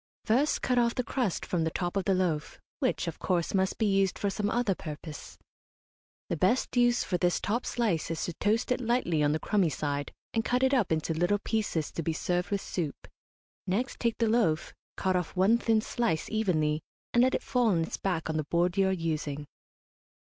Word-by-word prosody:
First 265 +7 +2
cut 250 -1 +2
off 235 -1 +2
the 250 - 0
crust 235 -5 -1
from 175 -3 0
the 160 - +1
top 175 +2 -3
of 195 - 0
the 195 - +3
loaf, 165 -5 -1 0.2
which, - - 0
of - - -5
course, 175 -3 0
must 190 0 +1
be 220 - +1
used 195 -2 +2
for 200 - -1
some 205 +1 -1
other 235 -3 +1
purpose. 155 -2 -8 0.9
The - - -1
best 190 +13 +1
use 240 0 +4
for 180 - -1
this 175 -1 +2
top 235 +4 -1
slice 210 -10 0
is 165 -1 -2
to 175 - -4
toast 215 +8 0
it 250 - +1
lightly 230 -10 +1
on 145 0 +3
the 155 - +1
crumby 195 -3 +2
side, 145 0 -3 0.2
and 225 - +1
cut 250 +3 +1
it 265 +1 +3
up 240 -10 +2
into 160 +1 0
little 175 +5 +2
pieces 205 -7 -1
to - - -3
be 165 +1 -1
served 180 +2 -1
with 200 -1 -1
soup. 160 -6 -4 0.6
Next 225 +8 -1
take 235 -2 0
the 230 - +2
loaf, 215 -9 +1 0.2
cut 190 -1 +1
off 180 -2 -2
one 200 +6 +4
thin 225 -2 +2
slice, 215 -9 -1
evenly, 160 -8 +1 0.3
and 240 - +5
let 260 +1 +4
it - - -2
fall 250 -2 +1
on 170 -6 +2
its - - -4
back 180 -4 -1
on 160 -1 -1
the 155 - -1
board 175 +4 +1
you 195 -1 +4
are - - +2
using. 155 -5 -2
190 Hz, 215 wpm, -29 LUFS, 165-225 Hz, 0.9 s, and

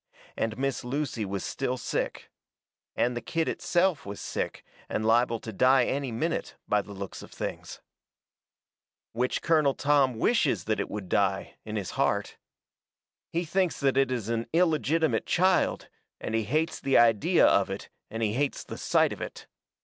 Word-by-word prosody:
And 110 -1 -2
Miss 135 0 -1
Lucy 125 -4 -2
was 100 -1 -4
still 130 -1 -2
sick. - - -3 0.6
And 120 0 +1
the 120 - -3
kid 165 +4 -1
itself 175 -2 +1
was 100 0 -7
sick, - - -4 0.2
and 110 - -1
liable 115 +1 +3
to 110 - -7
die 130 +4 +4
any 135 -2 -2
minute, 160 +9 -2
by 105 0 +2
the 100 - -12
looks 100 -1 -7
of - - -11
things. - - -6 1.3
Which 125 +2 -1
Colonel 155 -4 +3
Tom 140 -3 +3
wishes 230 - +2
that 110 - -1
it - - -2
would 105 -3 -5
die, 95 0 0
in 110 0 -5
his 100 -4 -3
heart. - - 0 0.9
He 170 +1 -1
thinks 180 +1 0
that 135 -2 +2
it 135 -1 +3
is 120 -5 -2
an 115 0 -1
illegitimate 160 -2 +2
child, 185 +1 +2 0.3
and - - -4
he 115 -1 +1
hates 155 +8 0
the 135 - +3
idea 115 -3 +5
of - - +4
it - - -6 0.2
and 115 +1 -3
he 105 -1 +1
hates 140 +3 -1
the - - -8
sight - - +2
of - - -10
it. - - -7
125 Hz, 170 wpm, -28 LUFS, 110-150 Hz, 1.3 s, idea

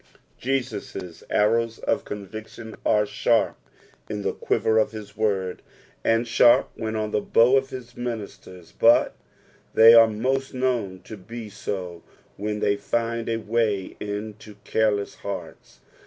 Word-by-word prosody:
Jesus' 125 -9 -4
artows 115 +2 +2
of - - -1
conviction 110 +2 -8
are 105 -1 +3
■sharp 105 +3 +1 0.6
in 105 -1 -4
the - - -1
quiver 110 0 +1
of 110 - 0
his 105 -2 -9
word, 100 -4 -1 0.4
and 115 +1 +2
sharp 120 +1 +5
when 110 -1 -4
on 110 -1 -2
the 105 - +1
bow 120 +5 +4
of 135 0 +1
his 125 -2 -9
ministers, 105 -7 -7
but - - +5 0.6
they 115 +1 +9
are 115 -1 +9
most 130 +5 -2
known 120 -8 -1
to 110 - -9
be 110 +3 -9
so 95 -4 -5 0.3
when 105 +1 -3
they 100 - +2
find 115 +2 -2
a 115 - 0
way 110 -3 -1
into 105 +1 -6
careless 105 -2 0
hearts. - - -8
110 Hz, 140 wpm, -24 LUFS, 105-115 Hz, 0.6 s, they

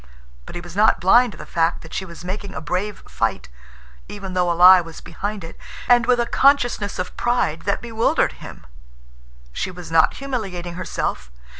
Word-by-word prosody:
But - - -9
he 175 - -5
was 175 0 -11
not 215 +2 +4
blind 235 +5 +4
to - - -13
the - - -9
fact 165 0 0
that 160 - -12
she 190 - -3
was 170 0 -11
making 195 +1 -5
a - - -3
brave 185 +6 -4
fight, - - -2 0.6
even 195 -2 -7
though 180 -1 +1
a 170 - -2
lie 180 +1 +8
was 165 -2 -10
behind 200 +3 -6
it, 165 - -9 0.3
and 240 -1 +4
with 250 -1 +3
a 235 - +2
consciousness 245 -6 +2
of 185 - -5
pride 240 -10 0
that 200 +3 -1
bewildered 225 -1 +1
him. - - -11 0.9
She - - -3
was 180 -2 -10
not 160 -1 +4
humiliating 195 -11 -5
herself. 170 - -4
185 Hz, 185 wpm, -21 LUFS, 170-220 Hz, 0.9 s, lie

